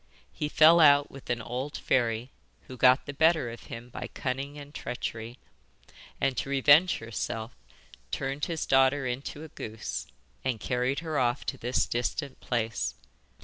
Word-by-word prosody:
He 150 - -3
fell 160 +3 +7
out 145 -2 +6
with 135 - -12
an 120 -2 -1
old 130 +6 -4
fairy, 120 0 0 0.3
who 130 - -11
got 130 +2 +5
the 145 - -6
better 160 -4 +3
of 120 - -11
him 115 +1 -8
by - - -6
cunning 140 +2 -4
and 145 0 -10
treachery, 120 -2 -5 0.8
and 135 -1 +1
to - - -2
revenge 145 +6 +5
herself 115 0 -5 0.5
turned 135 - -2
his 165 -2 -3
daughter 135 +1 +3
into 135 +4 -4
a 160 - -9
goose 110 -5 -6 0.4
and 125 -4 -1
carried 125 +5 -1
her 160 -3 -2
off 120 -1 0
to - - -3
this 125 +2 +1
distant 130 +3 -3
place. 115 -2 -2
130 Hz, 155 wpm, -28 LUFS, 120-145 Hz, 0.8 s, fell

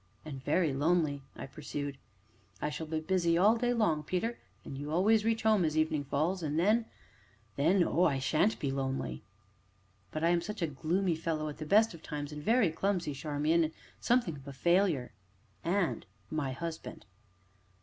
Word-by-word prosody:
"And 135 -4 -7
very 165 -3 +2
lonely!" 150 0 +1
I - - -6
pursued. 145 0 -6 0.6
"I 150 - -2
shall 160 +1 -5
be 160 0 -1
busy 170 0 +1
all 205 +6 +5
day 245 +1 +1
long, 210 -11 +2
Peter, 185 +9 -2 0.3
and - - -6
you 145 +2 -5
always 210 +6 +4
reach 225 0 0
home 215 -4 +4
as 155 -1 0
evening 155 -2 +1
falls, 165 +8 0
and 150 -1 -2
then 215 +7 +3 0.7
then 175 +6 +4
oh! 170 +1 +2
I 140 -4 +2
sha'n't 155 +10 +2
be 140 - -1
lonely." 135 - -2 0.9
"But 155 - -3
I 165 - +4
am 175 0 +3
such 210 +1 -4
a 155 -3 -2
gloomy 170 +5 0
fellow 155 -1 -2
at 150 - -9
the 155 - -5
best 215 +4 +5
of 165 - -11
times, 145 -2 -5
and 150 0 -6
very 220 0 +3
clumsy, 175 -2 -1
Charmian, 150 +3 +1
and 155 - -5 0.3
something 235 -11 +1
of 135 0 -14
a 140 - -6
failure." 170 -3 +2 0.5
"And 175 0 0 0.3
my 150 -4 -1
husband." 165 +4 -6
160 Hz, 180 wpm, -31 LUFS, 145-185 Hz, 0.9 s, all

